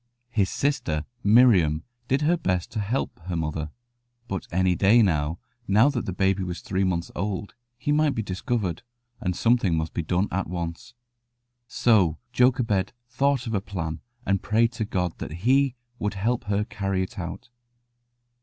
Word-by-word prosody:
His 100 -5 +2
sister 120 - -1 0.2
Miriam 100 -9 +5 0.2
did 135 +3 +1
her 165 +4 +4
best 90 - -1
to 115 - -3
help 110 +3 -2
her 90 - -2
mother; 80 -1 -2 0.6
but 95 -3 -4
any 90 +1 +2
day, 105 +6 +5
now 80 -3 +1 0.3
that 120 +5 +3
the - - -1
baby 95 +1 +1
was 90 -1 -4
three 95 0 -1
months 85 -3 -1
old, 100 +1 -3 0.2
he 145 - -1
might 150 -1 +3
be 110 - -1
discovered, 95 - -2 0.4
and 90 -1 -2
something 115 -7 +2
must 80 0 -2
be - - -1
done 90 +5 0
at 95 +1 -1
once. 85 +6 -5 0.7
So 100 -11 +3 0.2
Jochebed 120 -6 +2 0.2
thought 135 +1 +1
of 115 - -3
a 100 - +1
plan, 80 -6 -4 0.2
and 95 -1 +1
prayed 115 +2 +2
to 115 -2 -3
God 90 -4 -1
that 85 +3 -6
He 135 +1 +3 0.2
would 105 0 -2
help 115 +5 -1
her 100 0 +1
to - - -8
carry 95 -3 -1
it 105 +3 -7
out. 90 +6 -6
100 Hz, 165 wpm, -25 LUFS, 90-120 Hz, 0.7 s, Miriam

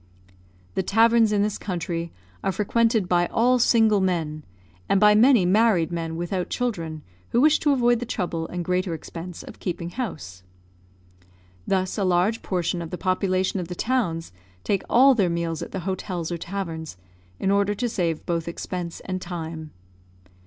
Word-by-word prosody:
The - - 0
taverns 225 +3 +4
in 205 -1 +2
this 210 0 -2
country 170 -3 -3 0.3
are - - +1
frequented 225 0 +1
by 175 -1 +2
all 250 +2 +2
single 220 -4 +4
men, 165 -5 -1 0.5
and 195 - +4
by 210 0 +6
many 230 -2 +5
married 190 -3 +3
men 165 -1 -3
without 175 +2 -3
children, 165 -11 -3 0.3
who 235 - +2
wish 305 +3 +5
to 295 - +2
avoid 240 -3 +3
the 245 - -5
trouble 175 -8 -2
and 175 -1 -5
greater 180 -1 0
expense 165 +2 -8
of - - -12
keeping 175 -1 -4
house. 95 - -6 1.3
Thus 185 +2 0
a - - +1
large 185 +4 +2
portion 175 -1 -1
of 165 - -6
the 180 - -5
population 185 +1 0
of 175 - -4
the 180 - -6
towns 175 - -1 0.3
take 195 - 0
all 265 +3 +6
their 200 -7 +2
meals 170 -1 -2
at - - -6
the 190 - -4
hotels 180 -2 -3
or 170 - -2
taverns, 165 - -5 0.4
in 195 - +1
order 200 +1 +2
to 240 +4 -1
save 175 -8 -2
both 170 -1 -2
expense 170 0 -5
and 185 -1 -4
time. 165 -3 -6
185 Hz, 165 wpm, -24 LUFS, 170-215 Hz, 1.3 s, by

